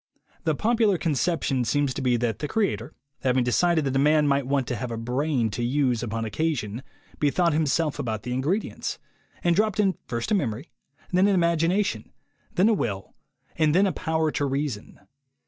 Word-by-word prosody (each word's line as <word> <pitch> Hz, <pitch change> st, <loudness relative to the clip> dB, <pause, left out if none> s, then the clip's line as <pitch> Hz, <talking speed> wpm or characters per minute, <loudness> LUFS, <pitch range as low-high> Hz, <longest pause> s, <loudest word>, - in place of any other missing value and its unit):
The 160 Hz, -, +2 dB
popular 220 Hz, 0 st, +2 dB
conception 155 Hz, -4 st, 0 dB
seems 135 Hz, +4 st, +1 dB
to -, -, -4 dB
be 125 Hz, -2 st, +2 dB
that 115 Hz, -3 st, -1 dB
the 150 Hz, -, -2 dB
Creator, 165 Hz, -, -1 dB, 0.2 s
having 130 Hz, -1 st, +2 dB
decided 160 Hz, +6 st, +2 dB
that 135 Hz, -1 st, -1 dB
a -, -, +3 dB
man 150 Hz, +1 st, +4 dB
might 140 Hz, -2 st, +1 dB
want 135 Hz, -1 st, +1 dB
to 120 Hz, -, -1 dB
have 120 Hz, +3 st, -4 dB
a 115 Hz, -, -4 dB
brain 125 Hz, 0 st, 0 dB
to 120 Hz, +4 st, -3 dB
use 125 Hz, -2 st, +1 dB
upon 115 Hz, -1 st, -3 dB
occasion, 120 Hz, -2 st, -2 dB, 0.4 s
bethought 165 Hz, +3 st, +2 dB
Him 155 Hz, 0 st, +1 dB
self 150 Hz, +1 st, 0 dB
about 110 Hz, -6 st, -3 dB
the 125 Hz, -, -3 dB
ingredients, 155 Hz, -, -2 dB, 0.5 s
and 175 Hz, -1 st, +3 dB
dropped 215 Hz, +1 st, +1 dB
in 195 Hz, -3 st, +2 dB
first 115 Hz, -, -3 dB
a -, -, +4 dB
memory, 135 Hz, -, -2 dB, 0.4 s
then 185 Hz, +2 st, +4 dB
an 200 Hz, -, +3 dB
imagination, 170 Hz, +3 st, +1 dB, 0.4 s
then 185 Hz, +4 st, +4 dB
a 225 Hz, -, +4 dB
will, 100 Hz, -, -3 dB, 0.4 s
and 155 Hz, 0 st, +2 dB
then 195 Hz, +2 st, +5 dB
a 195 Hz, -, +1 dB
power 160 Hz, -1 st, 0 dB
to 145 Hz, -, -1 dB
reason. 135 Hz, -5 st, -3 dB
145 Hz, 185 wpm, -25 LUFS, 125-170 Hz, 0.5 s, then